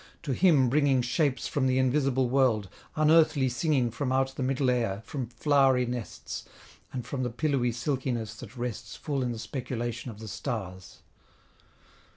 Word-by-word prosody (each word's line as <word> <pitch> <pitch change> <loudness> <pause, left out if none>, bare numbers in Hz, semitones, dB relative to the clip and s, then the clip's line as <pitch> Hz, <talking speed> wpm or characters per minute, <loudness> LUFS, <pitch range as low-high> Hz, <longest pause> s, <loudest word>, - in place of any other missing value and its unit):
to 140 -5 -1
him 150 -4 +4
bringing 140 0 +3
Shapes 135 +2 0
from 135 -3 0
the 130 0 +2
invisible 130 0 +2
world, 120 -6 +2 0.3
unearthly 155 -3 +4
singing 125 -1 +1
From 130 +3 -2
out 135 0 +1
the - - -4
middle 130 0 +1
air, 115 -4 -1
from 135 -6 -4
flowery 130 +1 +3
nests, 120 -2 -5 0.5
And 125 -3 -5
from 135 +1 -3
the 125 - 0
pillowy 125 -1 0
silkiness 120 -2 -2
that 125 - -11
rests 120 -2 -5
Full 140 -3 -2
in 125 -1 -1
the 115 - -5
speculation 120 0 -4
of 110 - -9
the 110 0 -9
stars. 95 -6 -6
130 Hz, 160 wpm, -28 LUFS, 120-140 Hz, 0.5 s, him